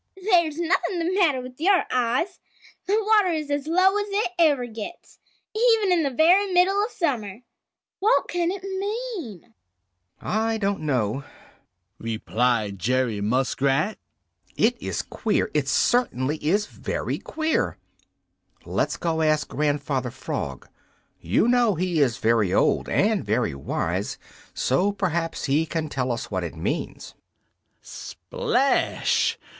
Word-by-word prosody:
"There's 345 -6 +2
nothing 350 +1 0
the 340 +2 -1
matter 325 -10 +3
with 255 +1 -11
your 380 +2 +4
eyes. 255 +9 0 0.5
The 405 +3 +3
water 430 -2 +4
is 305 -2 -3
as 285 0 -1
low 375 +5 +3
as 410 - -2
it 400 -2 0
ever 290 -7 +4
gets, 225 +8 -9 0.4
even 445 -4 +3
in 350 -2 +3
the 285 - +1
very 355 +9 +4
middle 380 +3 +3
of 430 - -2
summer. 235 - -2 0.6
What 435 +5 +3
can 345 -1 0
it 380 0 -4
mean?" 390 - -5 0.7
"I 225 +1 -1
don't 200 -2 -1
know," 135 -4 -1 0.8
replied 110 -2 -1
Jerry 125 -2 0
Muskrat. 135 - +1 0.6
"It - - +3
is - - -3
queer! - - -1
It - - 0
certainly 150 - +1
is 200 +7 +2
very - - -4
queer! 320 0 -1 0.9
Let's - - -1
go 165 -1 -1
ask 155 -1 +1
Grandfather 145 -3 -1
Frog. 70 - -5 0.5
You - - +1
know 240 -4 +3
he 175 -1 0
is 125 -5 +2
very 110 -4 +2
old - - +2
and 210 0 +2
very 110 - 0
wise, 70 - -3 0.4
so 180 +11 +1
perhaps 170 -4 -2
he 150 +4 +1
can 155 -1 -3
tell 130 -3 -1
us 115 -2 -4
what 95 -2 -1
it 85 - -5
means." 80 - -4 0.7
Splash! - - 0
220 Hz, 130 wpm, -24 LUFS, -, 0.9 s, your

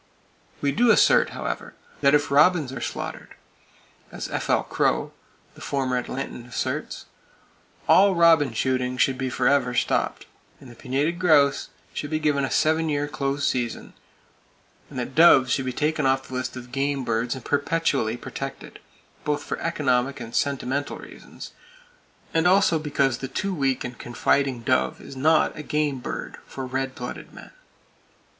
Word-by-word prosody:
We 140 - +1
do 240 - +3
assert, - - +5
however, - - -5 0.2
that 140 0 +4
if 145 -1 +1
robins 150 -1 +4
are 125 - -6
slaughtered - - -6 0.8
as - - -6
F.L. - - 0
Crow, - - 0 0.4
the - - -16
former 130 -2 -1
Atlantan 125 -2 -6
asserts, 120 - -4 0.8
all 195 0 +6
robin 165 -5 +5
shooting 125 +1 -1
should 130 +1 +2
be 130 0 -3
forever 125 0 +1
stopped; - - 0 0.3
that - - -15
the 120 - -12
pinnated 140 +8 -1
grouse 145 -6 +3 0.2
should 145 - -4
be 155 - 0
given 150 -2 +1
a 135 - -1
seven 160 +1 +2
year 145 0 0
close 140 -1 -2
season, 120 -2 -3 1.0
and - - -9
that 125 +1 -4
doves 135 -6 +6
should 135 - 0
be 130 - -1
taken 150 +1 0
off 135 0 0
the - - -9
list 130 0 -3
of 125 -1 -10
game 140 0 -1
birds 115 +2 -1
and 130 - -10
perpetually 145 -6 0
protected, 135 +2 -7 0.4
both 150 -1 -1
for - - -4
economic 140 -4 0
and 115 -1 -8
sentimental 140 +1 -1
reasons, - - -11 0.8
and 165 +1 +3
also 185 -3 +4
because 140 -4 0
the 135 - -4
too 195 +9 -3
weak 135 -6 0
and 125 -1 -7
confiding 130 +1 0
dove 130 +2 +1
is 135 - -11
not 155 +4 +3
a - - -6
"game" 150 -2 -1
bird - - -6
for 135 - -6
red 130 +1 -3
blooded 125 - -7
men. - - -12
140 Hz, 155 wpm, -24 LUFS, 130-150 Hz, 1.0 s, all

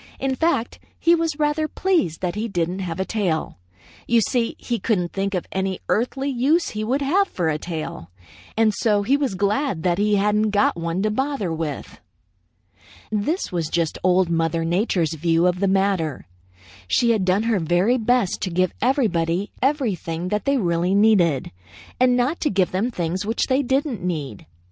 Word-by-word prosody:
In 270 0 0
fact, 320 -7 0 0.2
he 335 - +3
was 330 -3 0
rather 300 +1 +1
pleased 330 - 0
that 180 -2 -1
he 215 +2 -3
didn't 180 -2 -2
have 175 -2 -4
a 190 - 0
tail. 185 - -2 0.5
You 235 0 +4
see, 230 +1 0
he 235 -2 -3
couldn't 180 -7 -1
think 195 0 -1
of 180 - -2
any 190 -1 -2
earthly 265 +5 0
use 285 +6 +1
he 215 0 -4
would 265 +6 0
have 380 +9 +2
for 175 - -1
a 155 -1 -1
tail, 155 - -6 0.5
and 220 -1 +3
so 210 -3 +1
he 265 +7 +3
was 275 -8 -1
glad 205 - 0
that 175 0 +1
he 210 0 +2
hadn't 210 +2 +2
got 205 0 +2
one 170 +2 -2
to 215 - +1
bother 265 - -1
with. 155 -3 -5 1.1
"This 220 - -1
was 170 -3 -1
just 165 -2 -1
Old 185 0 +3
Mother 165 0 0
Nature's 175 -2 0
view 165 +2 +1
of 180 0 +1
the 200 - +1
matter. 190 -6 0 0.6
She 235 - +3
had 215 -4 +1
done 185 +3 +2
her 225 -3 +1
very 175 +9 +2
best 235 -3 +1
to 190 - -1
give 185 +1 0
everybody 195 - +1
everything 200 - -1
that 210 +1 -2
they 280 0 +2
really 175 -2 +1
needed, 195 -10 +3 0.5
and 250 -1 +4
not 255 +7 0
to 300 - 0
give 190 -2 +1
them 195 +7 0
things 180 -3 -2
which 225 +3 0
they 265 +1 +2
didn't 265 - -1
need. 150 - -4
200 Hz, 180 wpm, -22 LUFS, 175-245 Hz, 1.1 s, You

